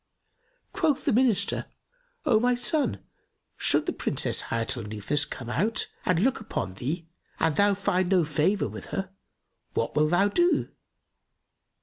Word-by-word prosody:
Quoth 300 Hz, -3 st, 0 dB
the 275 Hz, -, +2 dB
Minister, 240 Hz, -3 st, +2 dB, 0.6 s
"O 235 Hz, -7 st, +4 dB
my 245 Hz, +2 st, +2 dB
son, 245 Hz, -, 0 dB, 0.5 s
should -, -, +2 dB
the -, -, -1 dB
Princess -, -, +1 dB
Hayat 115 Hz, 0 st, 0 dB
al -, -, -5 dB
Nufus 110 Hz, +8 st, 0 dB
come 125 Hz, -, -7 dB
out 210 Hz, -, 0 dB, 0.2 s
and 180 Hz, 0 st, +2 dB
look 265 Hz, +1 st, +2 dB
upon 155 Hz, -, -4 dB
thee 155 Hz, -, -4 dB, 0.3 s
and 160 Hz, -2 st, +1 dB
thou 205 Hz, 0 st, +3 dB
find 185 Hz, -2 st, 0 dB
no 185 Hz, -3 st, +4 dB
favour 160 Hz, +7 st, +1 dB
with -, -, -8 dB
her 190 Hz, -1 st, -4 dB, 0.6 s
what 115 Hz, -, -1 dB
wilt 150 Hz, 0 st, +3 dB
thou 175 Hz, +4 st, +3 dB
do?" 345 Hz, -, +2 dB
190 Hz, 145 wpm, -27 LUFS, 150-225 Hz, 0.6 s, O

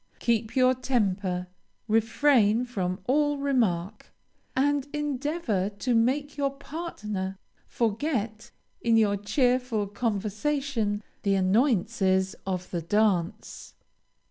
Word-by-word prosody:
Keep 230 Hz, -1 st, 0 dB
your 255 Hz, -1 st, +5 dB
temper, 200 Hz, -8 st, -1 dB, 0.4 s
refrain 225 Hz, +1 st, +3 dB
from 185 Hz, -6 st, -3 dB
all 290 Hz, +3 st, +2 dB
remark, 220 Hz, -9 st, -1 dB, 0.4 s
and 285 Hz, +1 st, +1 dB
endeavor 290 Hz, -, -1 dB
to 210 Hz, +5 st, -2 dB
make 270 Hz, +6 st, +1 dB
your 280 Hz, -1 st, +1 dB
partner 210 Hz, -, -5 dB, 0.3 s
forget, 225 Hz, -2 st, -2 dB, 0.3 s
in 230 Hz, -1 st, +3 dB
your 210 Hz, -2 st, +3 dB
cheerful 245 Hz, +1 st, +1 dB
conversation, 215 Hz, +2 st, -1 dB, 0.2 s
the 200 Hz, -1 st, +2 dB
annoyances 190 Hz, -2 st, +2 dB
of 185 Hz, -1 st, -3 dB
the 175 Hz, -, -2 dB
dance. 205 Hz, +1 st, -1 dB
225 Hz, 95 wpm, -27 LUFS, 200-265 Hz, 0.4 s, your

